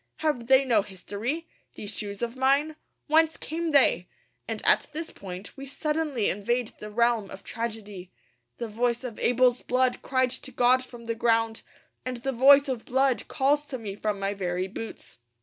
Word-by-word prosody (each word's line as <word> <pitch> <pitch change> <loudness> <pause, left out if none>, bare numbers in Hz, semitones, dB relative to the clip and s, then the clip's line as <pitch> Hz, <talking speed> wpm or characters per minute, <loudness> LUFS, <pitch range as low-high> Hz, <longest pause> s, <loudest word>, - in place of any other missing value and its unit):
Have 295 -7 -1
they 265 +1 +6
no 230 -5 +4
history, 210 - -5 0.3
these 205 +1 -6
shoes 205 +1 -5
of 235 +1 -3
mine? 280 +4 +2 0.3
Whence 320 +1 +3
came 330 +1 -3
they? 270 - +4 0.4
And 225 -2 -4
at - - +5
this 320 +2 -4
point 185 0 -9
we 275 0 -8
suddenly 300 -4 -1
invade 235 +4 0
the 210 - -7
realm 230 -2 +1
of 190 - -10
tragedy. 210 -5 -5 0.5
The 235 - -4
voice 235 +3 -1
of 240 -4 -6
Abel's 250 0 +3
blood 255 0 +1
cried 260 -1 +1
to 260 +1 -4
God 250 +1 +3
from 240 -2 -12
the 230 - -1
ground; 225 -1 +1 0.4
and 255 -1 -4
the 270 +3 -2
voice 275 +3 +6
of 255 -4 -3
blood 265 0 +1
calls 290 +1 +2
to 275 -3 -5
me 210 -4 -6
from 210 0 -2
my 195 +1 -1
very 185 -1 -2
boots. 215 - -9
240 Hz, 175 wpm, -27 LUFS, 215-270 Hz, 0.5 s, they